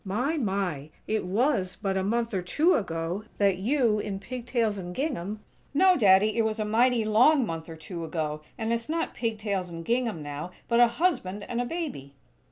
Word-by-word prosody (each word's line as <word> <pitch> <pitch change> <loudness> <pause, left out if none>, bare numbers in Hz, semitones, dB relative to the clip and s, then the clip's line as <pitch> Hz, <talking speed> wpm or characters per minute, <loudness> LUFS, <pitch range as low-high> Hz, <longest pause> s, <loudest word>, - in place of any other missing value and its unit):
My, 245 +11 -1
my! 190 - -2 0.2
It 215 -3 -1
was 200 -2 +1
but 195 -1 -2
a 190 - +1
month 230 +3 0
or 190 - 0
two 310 - +2
ago 170 +1 -2
that 200 -3 +3
you, 230 -1 +2
in 205 -2 -3
pig 245 +4 -7
tails 225 -5 0
and 180 -1 -7
gingham 215 - -3 0.2
" - - -35
"No, 370 +4 +6
Daddy! 205 - +5
It - - +6
was 220 0 -1
a 215 - 0
mighty 230 +1 +3
long 250 +6 +5
month 165 -3 -5
or 165 - -7
two 165 +2 -7
ago; 155 -2 -3 0.2
and 225 0 -1
it's 235 +4 -3
not 330 +1 -1
pig 225 -2 -2
tails 200 -4 -2
and 165 -1 -7
gingham, 230 -9 0
now, 145 +3 -5 0.2
but 235 0 +2
a 240 - +8
husband 230 - -1
and 240 0 -1
a - - -1
baby." 245 - -5
215 Hz, 205 wpm, -27 LUFS, 185-240 Hz, 0.2 s, a